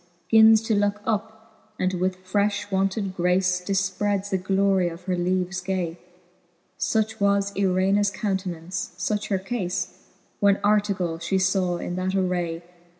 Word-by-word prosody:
Gins 220 0 +7
to 225 - 0
look, 205 0 +1
up, 220 0 -5
and 185 0 0
with 185 +1 -2
frefli 205 +1 0
wonted 195 0 0
grace 180 0 +1
Pifpreds 195 +1 -1
the 190 - +1
glorie 190 -1 +2
of 170 +1 -10
her 185 0 -1
leaves 180 +1 -1
gay; 180 -2 -3 0.8
Such 220 -1 0
was 200 0 +2
Irenas 195 +1 +2
countenance, 185 -3 -3
fuch 210 +3 -1
her 195 - +1
caie, 190 -2 -2 0.5
When 200 -1 +5
Artegall 200 -5 +1
fhe 190 +3 0 0.2
faw 180 -3 0
in 175 +1 -4
that 185 +1 -1
array. 175 -3 -1
190 Hz, 140 wpm, -24 LUFS, 180-205 Hz, 0.8 s, Gins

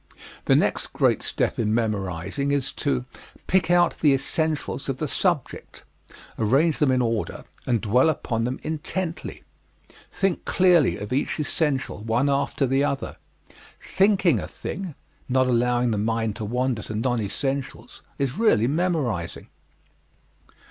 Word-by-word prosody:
The - - +4
next - - 0
great - - +2
step - - -1
in 110 -1 +1
memorizing 105 - -2
is 140 -2 0
to 65 -2 -1 0.4
pick 185 -1 +2
out 175 -1 +3
the 145 -3 +4
essentials 150 +1 -1
of 135 - -1
the 155 - -2
subject, 170 -2 -2 0.6
arrange 135 +9 +2
them 150 - +3
in 130 -1 +2
order, 115 -2 -2 0.2
and 120 -4 +1
dwell 125 +8 +3
upon 115 -6 -1
them 125 +2 -2
intently. 165 +3 -4 0.7
Think 195 -3 -1
clearly 180 -7 +3
of 105 +4 -5
each 140 +4 -1
essential, 145 -6 -1
one 115 +6 +1
after 140 0 0
the 135 +2 +2
other. 140 -2 -2 0.6
Thinking 190 - +2
a - - -5
thing 185 -6 -6 0.3
not 130 +1 +3
allowing 125 0 +2
the 105 - 0
mind 110 0 -1
to 110 - -4
wander 125 +1 -1
to 105 - -6
non 120 +1 0
essentials 135 +6 -4 0.2
is 140 - -2
really 215 - +4
memorizing. 140 - -1
130 Hz, 140 wpm, -24 LUFS, 115-155 Hz, 0.7 s, The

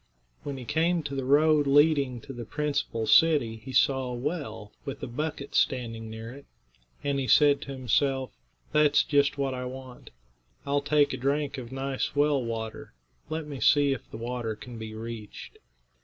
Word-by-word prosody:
When 140 -2 -5
he 125 - -8
came 165 +4 +1
to 140 - -5
the 135 -1 -2
road 150 +1 +4
leading 140 -4 +3
to 135 - -9
the 120 -1 -6
principal 140 -4 -2
city 120 -2 +4
he 125 +4 -10
saw 130 +1 +3
a 125 - -4
well, 135 -6 -4
with 140 -1 -6
a - - -3
bucket 140 +2 -4
standing 115 -3 0
near 110 +1 -7
it, 140 +2 -13 0.6
and 140 -1 0
he 130 - -2
said 145 0 +5
to 140 - -7
himself: 130 +1 0 0.4
"That's 150 -1 +4
just 145 -1 +2
what 135 -1 -1
I 125 0 -4
want. 130 0 -9 0.6
I'll 140 0 +1
take 145 0 +2
a - - -3
drink 140 +1 -1
of 120 -1 -9
nice 135 +1 -3
well 145 -2 +3
water. 110 -1 -5 0.4
Let 160 0 -3
me 145 -3 -7
see 145 0 +4
if 135 - -8
the - - -8
water 115 -1 -3
can 120 +1 -10
be 110 0 -7
reached." 110 -2 -8
135 Hz, 180 wpm, -28 LUFS, 120-145 Hz, 0.6 s, said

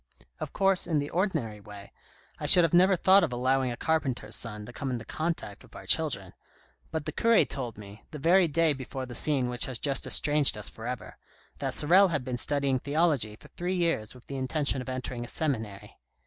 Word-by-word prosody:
Of - - -5
course, 195 -2 +2
in 160 - 0
the 145 0 -2
ordinary 160 - -1
way, 100 -1 -12 0.5
I - - -3
should 175 - +9
have 165 - +1
never 185 +2 +5
thought 190 +3 +5
of - - 0
allowing 130 +1 0
a 120 - -6
carpenter's 135 -9 -1
son 105 -2 -5
to 125 - -11
come 135 - -4
into 120 -3 -4
contact 160 -10 -4
with - - -18
our - - -10
children, - - 0 0.6
but 160 -2 -4
the - - -3
cure 230 -1 +3
told 125 -6 -5
me, 105 0 -12
the 155 - -8
very 175 +5 +4
day 160 0 +2
before 130 0 -6
the 125 - -9
scene 135 -2 +3
which 125 -1 +1
has 130 -3 -2
just 140 +1 -1
estranged 145 -5 +2
us 105 - -2
for 115 +1 -9
ever, 125 -1 -6 0.4
that - - -2
Sorel 185 +6 +5
has 150 -7 -2
been 125 -1 -4
studying 140 0 0
theology 145 -7 0
for - - -17
three 180 +2 -3
years 165 -11 -1
with 125 - -16
the 140 - -6
intention 135 0 -2
of 125 - -8
entering 125 -1 -5
a - - -8
seminary. 110 -9 -4
135 Hz, 210 wpm, -28 LUFS, 120-160 Hz, 0.6 s, should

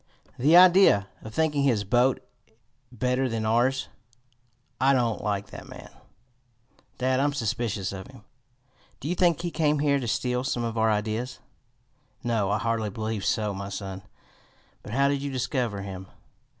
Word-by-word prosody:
"The 150 +7 +6
idea 180 - +6
of 110 - -9
thinking 150 +2 +1
his 120 -7 +2
boat 125 +6 +1 0.6
better 125 +2 0
than 115 -1 -2
ours! 120 +4 +1 0.9
I 135 +1 +4
don't 120 -4 0
like 100 -1 -2
that - - -10
man, - - -11 1.1
dad. 130 0 +1
I'm 145 +1 +1
suspicious 110 -5 -2
of 95 -1 -7
him. 130 -5 -15 0.8
Do 140 - -6
you 170 - 0
think 170 -2 +2
he 175 -1 -3
came 150 -2 +1
here 140 -1 +2
to 125 - -4
steal 125 +2 -1
some 125 -2 -2
of 115 -1 -3
our 110 0 +2
ideas?" 110 +4 -2 0.9
"No, 115 -4 0
I 105 - +1
hardly 115 -1 -1
believe 110 0 -4
so, 105 -2 0
my 100 0 -6
son. 95 -1 -6 0.8
But 105 - -9
how 140 +2 +3
did 140 -1 0
you 140 - -3
discover 125 -6 -2
him?" 95 -1 -7
120 Hz, 160 wpm, -26 LUFS, 105-135 Hz, 1.1 s, The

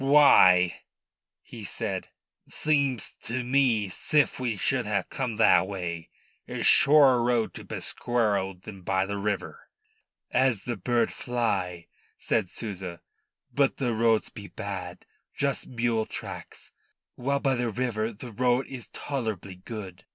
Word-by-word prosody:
"Why," 115 -11 +6 0.6
he - - -10
said, - - -3 0.4
"seems 140 -5 0
to 125 +2 -2
me 125 -5 +2
'sif 145 +11 +1
we 120 -5 -1
should 125 +4 0
ha' 100 -2 -1
come 125 -5 -3
that 95 -4 +5
way. 85 -4 -5 0.4
I's - - -3
shorrer 140 -4 +6
road 120 -2 +1
to - - -8
Pesqueira 105 -6 -1
than 100 -3 -9
by 95 +1 0
the 100 +1 -4
river." 105 - -4 0.6
"As 125 -6 +2
the 120 - -3
bird 115 +3 0
fly," 95 -8 -2 0.3
said 105 -6 0
Souza. 95 -6 -6 0.5
"But 140 -1 +2
the 125 -4 0
roads 115 0 +2
be 100 -1 -10
bad 95 -4 -7 0.3
just 140 -1 -1
mule 115 -2 0
tracks, - - -8 0.4
while 140 +3 -1
by 135 -1 +1
the 120 -2 -1
river 115 -1 -1
the 120 +3 -9
road 125 +3 +1
is 125 -4 -8
tolerable 110 -9 -4
good." 95 -1 -9
115 Hz, 135 wpm, -27 LUFS, 95-125 Hz, 0.6 s, Why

